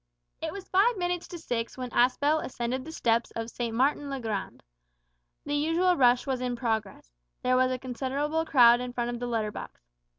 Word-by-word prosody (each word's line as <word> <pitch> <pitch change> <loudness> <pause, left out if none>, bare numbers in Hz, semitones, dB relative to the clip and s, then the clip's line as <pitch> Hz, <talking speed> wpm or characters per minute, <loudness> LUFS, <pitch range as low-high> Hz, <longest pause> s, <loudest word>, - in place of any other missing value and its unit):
It - - -3
was 395 -1 -8
five 415 +5 +3
minutes 355 -1 -2
to 350 - -7
six 240 -8 -3
when 250 -1 -5
Aspel 285 +6 +2
ascended 250 +1 -3
the 320 - -7
steps 235 -6 +1
of 225 0 -4
St. 235 -2 -3
Martin's 280 +3 +1
le 275 -1 -3
Grand. 215 -5 -4 0.8
The 290 - -3
usual 330 +5 +2
rush 245 -4 +4
was 260 -2 -2
in 250 -1 -1
progress. 220 - -3 0.3
There 255 0 +3
was 255 0 +3
a 255 - -1
considerable 275 +5 -2
crowd 245 -6 +6
in 250 0 -5
front 240 -1 -2
of 240 - -5
the 245 - -3
letter 220 -3 -1
box. - - -9
255 Hz, 195 wpm, -28 LUFS, 235-295 Hz, 0.8 s, crowd